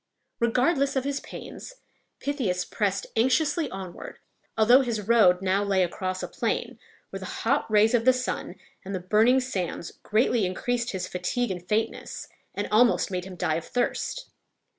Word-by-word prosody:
Regardless 270 +5 +2
of 265 - +1
his 280 0 -2
pains, - - -9 0.4
Pythias 220 -12 -1
pressed 200 -3 -1
anxiously 290 +6 +2
onward, 190 -4 -8 0.4
although 240 +5 +6
his 235 -5 -2
road 195 -6 +5
now 195 +2 +2
lay 195 -2 +2
across 185 +1 -3
a - - -2
plain, - - -2 0.3
where - - -5
the - - -7
hot - - -1
rays 215 +1 +4
of 235 -2 +3
the 255 - +6
sun 255 0 -3 0.3
and 195 0 -5
the - - -2
burning 220 +8 +4
sands 185 -10 -3
greatly 225 +1 +2
increased 240 +6 -1
his 190 -6 -3
fatigue 195 +6 -2
and 180 -1 -7
faintness, 220 +1 -2 0.3
and - - -2
almost 230 -1 +4
made 180 -1 -3
him 190 -1 -8
die 165 -3 0
of 165 - -6
thirst. 245 - -2
220 Hz, 160 wpm, -26 LUFS, 185-250 Hz, 0.4 s, although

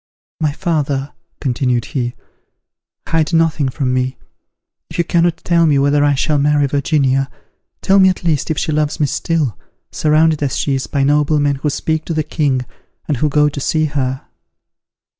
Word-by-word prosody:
"My 155 -2 +1
father," 145 -4 -2 0.3
continued 125 -2 0
he, 120 -3 -3 0.9
"hide 160 0 0
nothing 160 -4 +2
from 130 -1 -2
me; 130 +1 -1 0.7
if - - -8
you 170 - +3
cannot 170 0 +1
tell 170 -1 +3
me 145 -2 +3
whether 145 +1 +3
I 145 -1 +3
shall 150 +2 +1
marry 145 0 +2
Virginia, 140 -1 +1 0.5
tell 195 +1 +4
me 190 0 +6
at 185 - -3
least 155 -4 0
if 160 - -1
she - - -1
loves 150 0 -1
me 150 - +3
still, 145 - -1 0.3
surrounded 155 0 +2
as 140 -3 -1
she 140 - 0
is 135 -1 -2
by 140 -2 0
noblemen 145 0 +2
who 150 +2 -1
speak 160 +2 -2
to 165 - -3
the 155 - +1
king, 140 -5 -1 0.4
and 150 - 0
who 150 +4 +1
go 150 +1 +3
to 145 -1 -4
see 155 +3 +1
her." 135 -3 -2
145 Hz, 175 wpm, -17 LUFS, 135-155 Hz, 0.9 s, me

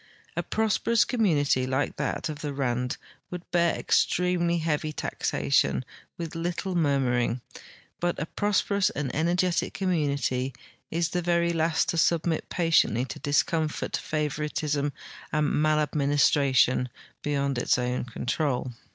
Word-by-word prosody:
A - - 0
prosperous 220 +1 +1
community 145 - +2
like 130 +2 -1
that - - -2
of 150 -1 -6
the 145 -2 -3
Rand 125 -2 -1 0.3
Avould 180 -1 -5
bear 170 -1 +3
extremely 175 -1 +1
heavy 155 -1 -1
taxation 70 - 0 0.3
Avith 165 -2 -4
little 175 +3 -3
murmuring; 130 -7 +1 0.6
but 175 0 0
a 150 - -2
prosperous 200 +1 +1
and 145 - -4
energetic 175 +3 +1
community 140 -8 0 0.3
is 165 0 0
the 180 - -1
very 170 0 +1
last 160 0 +1
to 165 - +1
submit 165 0 +1
patiently 160 - +2
to - - -7
discomfort, 155 +2 0
favoritism, 150 -1 -1 0.4
and 150 -1 +1
maladministration 140 -4 +3 0.3
be 145 - -2
yond 140 -2 0
its - - +2
OAvn 125 0 -2
control. 130 0 -1
150 Hz, 125 wpm, -27 LUFS, 135-170 Hz, 0.6 s, bear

